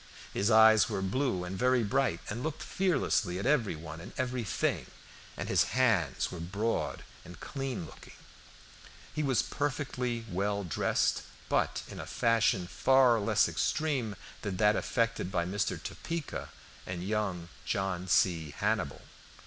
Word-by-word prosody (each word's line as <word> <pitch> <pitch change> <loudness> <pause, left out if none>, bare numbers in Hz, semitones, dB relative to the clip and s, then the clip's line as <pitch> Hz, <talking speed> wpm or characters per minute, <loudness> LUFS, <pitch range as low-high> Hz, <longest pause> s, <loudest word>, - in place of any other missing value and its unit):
His 100 - +1
eyes 110 -2 +7
were 95 - -2
blue 100 -2 0
and 90 +1 -5
very 125 +3 +3
bright, 110 -3 +1
and 110 +4 -4
looked 155 +2 -3
fearlessly 165 - +1
at 100 - -4
every 130 - +2
one 80 +1 -8
and - - -10
everything, 125 -4 -1 0.5
and - - -4
his - - +2
hands 100 - +2
were 90 - -6
broad 100 +7 -2 0.2
and 90 -1 -12
clean 135 - -4
looking. 75 - -13 1.0
He 155 - -1
was 135 -5 +2
perfectly 125 -4 -2
well 100 +1 -1
dressed, 90 - +1 0.3
but - - +1
in - - -9
a - - -6
fashion 110 -5 +2
far 125 +4 +4
less 100 - +3
extreme 135 -9 0 0.3
than 100 -4 -3
that 105 +1 +4
affected 115 -6 0
by 85 -3 0
Mr. 95 +3 -1
Topeka 165 -2 -5 0.4
and 90 -1 -4
young 95 -4 -2
John 95 -2 -2
C. 80 -5 +2
Hannibal. - - -1
105 Hz, 140 wpm, -31 LUFS, 90-125 Hz, 1.0 s, eyes